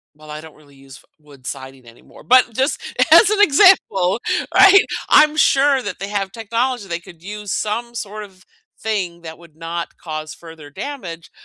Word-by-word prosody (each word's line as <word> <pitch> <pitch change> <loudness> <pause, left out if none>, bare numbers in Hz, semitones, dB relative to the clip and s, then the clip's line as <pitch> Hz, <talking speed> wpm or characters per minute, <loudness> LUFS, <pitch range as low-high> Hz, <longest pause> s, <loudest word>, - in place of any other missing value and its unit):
well, 155 0 -14
I 150 - -7
don't 160 0 -14
really 145 -2 -22
use 135 0 -15
f - - -20 0.2
wood 145 -4 -19
siding 130 0 -9
anymore, 115 0 -18
but 255 0 +5
just 265 +6 -1 0.3
as 445 - +7
an 420 -1 +1
example, 280 - +4 0.4
right, 395 0 +7 0.2
I'm 300 0 +5
sure 275 -2 +3
that 205 -5 -7
they 195 - -5
have 200 -2 -3
technology 230 0 -3
they 170 -2 -4
could 170 -1 -16
use 205 +1 -8
some 230 +5 -3
sort 215 -1 -6
of 190 -2 -17 0.3
thing 185 -6 -4
that 160 -1 -9
would 170 -3 -19
not 170 +1 -6
cause 155 -1 -7
further 160 -3 -13
damage, 170 - -8
190 Hz, 180 wpm, -18 LUFS, 160-240 Hz, 0.4 s, as